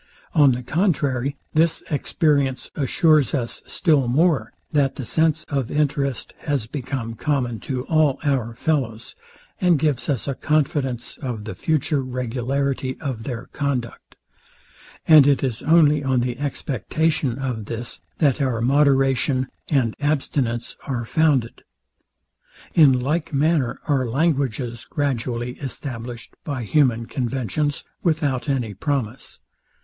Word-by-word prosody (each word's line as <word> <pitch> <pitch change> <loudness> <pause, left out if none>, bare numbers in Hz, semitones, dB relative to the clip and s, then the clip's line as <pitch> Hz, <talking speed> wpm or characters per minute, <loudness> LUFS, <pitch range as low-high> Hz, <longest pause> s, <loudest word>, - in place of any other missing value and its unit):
On 145 -4 +6
the 125 +1 -4
contrary, 140 -4 0 0.2
this 160 +1 +2
experience 140 -3 0
assures 150 +1 +3
us 120 -4 -3
still 150 -8 +2
more, 140 -3 +2 0.2
that 140 -3 +2
the 130 - -5
sense 155 +3 +1
of 135 -6 -2
interest 140 -3 -1
has 145 -7 -1
become 125 -2 -4
common 125 -3 -1
to 125 +4 -3
all 155 -4 +3
our 130 -6 0
fellows, 120 -6 -1 0.5
and 180 -3 +4
gives 145 -1 0
us 135 -3 -1
a 140 - 0
confidence 135 -4 -1
of 120 -6 -5
the 110 - -6
future 155 -2 0
regularity 130 +1 -2
of 125 -6 -4
their 120 -4 -4
conduct: 135 -5 -3 0.9
And 155 -3 +8
it 140 -1 +3
is 125 -5 -2
only 150 -2 +4
on 130 -2 +2
the 125 0 -2
expectation 145 -1 -1
of 125 -5 -3
this, 115 +2 -6 0.2
that 145 -2 +2
our 130 -4 0
moderation 135 0 +2 0.2
and 130 -7 +1
abstinence 135 -5 -1
are 120 -4 -2
founded. 140 -4 +1 1.1
In 140 -6 +6
like 150 +5 -1
manner 145 -2 +1
are 135 -4 +1
languages 130 -4 0
gradually 125 -3 -2
established 120 -4 -6
by 140 -5 -3
human 120 -2 +2
conventions 130 +2 -2 0.2
without 150 -5 0
any 125 -6 -1
promise. 130 - -3
135 Hz, 125 wpm, -22 LUFS, 120-150 Hz, 1.1 s, And